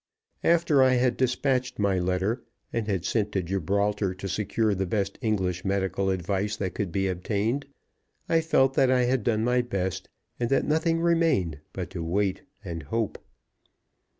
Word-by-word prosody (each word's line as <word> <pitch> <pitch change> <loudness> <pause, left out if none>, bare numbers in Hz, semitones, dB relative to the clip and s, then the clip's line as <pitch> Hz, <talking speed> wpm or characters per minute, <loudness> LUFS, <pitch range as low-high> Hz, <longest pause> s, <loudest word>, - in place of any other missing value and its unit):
After 165 -4 +4
I 130 -1 +5
had 125 -1 +2
dispatched 130 0 0
my 100 -3 +1
letter, 95 +7 0 0.3
and 115 -2 -1
had 95 -4 -1
sent 105 0 0
to 95 - 0
Gibraltar 100 +2 0
to 95 +1 -6
secure 105 +3 0
the 95 -1 -1
best 100 0 -2
English 95 -6 0
medical 95 0 0
advice 95 +3 -1
that 95 -3 -3
could 100 -5 -3
be 95 +2 0
obtained, 105 +9 -1 0.6
I 165 0 +3
felt 135 -5 +3
that 135 -1 +3
I 130 -1 +4
had 125 -1 +1
done 110 -1 +1
my 125 +1 +3
best, 95 -6 -3 0.3
and 120 -1 0
that 135 - +2
nothing 165 +2 +1
remained 165 - +2
but - - -5
to 85 - -4
wait 95 +3 0 0.2
and 85 -2 -4
hope. 110 +9 -2
105 Hz, 165 wpm, -27 LUFS, 95-125 Hz, 0.6 s, I